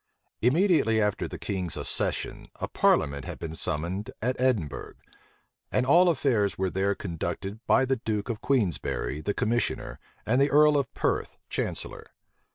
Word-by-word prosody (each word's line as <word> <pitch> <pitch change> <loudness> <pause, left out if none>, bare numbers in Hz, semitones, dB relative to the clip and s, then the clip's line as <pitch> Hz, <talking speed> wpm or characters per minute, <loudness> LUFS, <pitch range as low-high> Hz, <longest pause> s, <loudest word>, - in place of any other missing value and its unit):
Immediately 135 - +3
after 105 -2 0
the - - -7
king's 90 -4 -3
accession, - - -2
a - - -4
parliament 70 -1 +2
had - - -6
been 80 -2 -6
summoned 85 +6 -3
at 125 +3 0
Edinburgh; 105 - 0 0.8
and - - +2
all 175 +6 +6
affairs 120 - +1
were 95 -1 0
there 100 +1 +1
conducted 95 +3 -4
by 130 - +4
the 130 0 +1
duke 110 -3 -2
of 115 -2 -4
Queensberry 90 - 0
the 100 +5 -2
commissioner, 120 +2 -1 0.3
and 125 +5 +3
the 140 - +4
earl 150 +1 +6
of 140 -2 0
Perth - - -1
chancellor. - - -3
110 Hz, 150 wpm, -27 LUFS, 95-130 Hz, 0.8 s, all